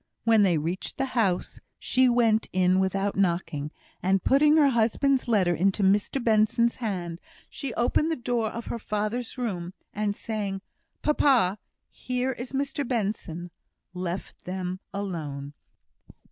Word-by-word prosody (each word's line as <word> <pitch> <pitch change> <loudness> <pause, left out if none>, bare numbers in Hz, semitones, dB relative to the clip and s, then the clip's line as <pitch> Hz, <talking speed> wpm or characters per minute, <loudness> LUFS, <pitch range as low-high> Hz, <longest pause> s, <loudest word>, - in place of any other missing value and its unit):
When 225 -2 +5
they 185 -5 +4
reached 165 +5 -3
the 270 - 0
house, 200 -8 0 0.2
she 255 0 +3
went 230 -2 +3
in 185 0 +3
without 195 +1 0
knocking, 170 -6 0 0.3
and 190 +1 +2
putting 300 +3 +5
her 290 -3 +6
husband's 255 +3 +2
letter 195 -7 +3
into 195 +4 +1
Mr 205 +7 +2
Benson's 225 +1 +3
hand, 180 -8 -3 0.3
she 275 -3 -4
opened 245 +6 +2
the 325 - +1
door 240 -3 -1
of 235 +2 -6
her 235 - -4
father's 215 +4 -3
room, 185 -7 -3 0.2
and 205 0 -1
saying 205 -4 -3 0.4
"Papa, 250 -10 +3 0.3
here 250 +1 -2
is 245 0 -6
Mr 280 0 -2
Benson," 195 -7 -3 0.4
left 180 0 -5
them 185 0 -4
alone. 150 -8 -5
210 Hz, 135 wpm, -27 LUFS, 185-245 Hz, 0.4 s, her